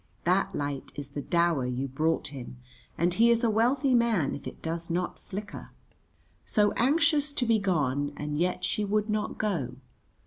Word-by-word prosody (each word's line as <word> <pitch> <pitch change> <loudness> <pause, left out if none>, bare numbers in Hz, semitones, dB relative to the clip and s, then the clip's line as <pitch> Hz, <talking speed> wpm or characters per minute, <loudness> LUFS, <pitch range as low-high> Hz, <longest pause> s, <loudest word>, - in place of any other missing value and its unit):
That 190 +2 +1
light 145 -2 -3
is 145 -1 -6
the 145 +1 -5
dower 170 -5 +1
you 125 +2 -2
brought 155 +4 0
him, 130 -3 -8 0.4
and 175 +2 +2
he 230 +5 +5
is 235 +1 +3
a 230 - +3
wealthy 255 +5 +2
man 230 - +2
if 140 - -7
it - - -9
does 165 +1 -4
not 175 +1 -2
flicker. 205 +2 -7 0.7
So 210 -2 +2
anxious 300 +2 +2
to 255 - 0
be 225 -2 +3
gone, 145 -7 0
and 150 0 -3
yet 180 +1 0
she 210 - 0
would 210 +1 0
not 215 0 -2
go. 160 - -1
180 Hz, 175 wpm, -28 LUFS, 145-220 Hz, 0.7 s, he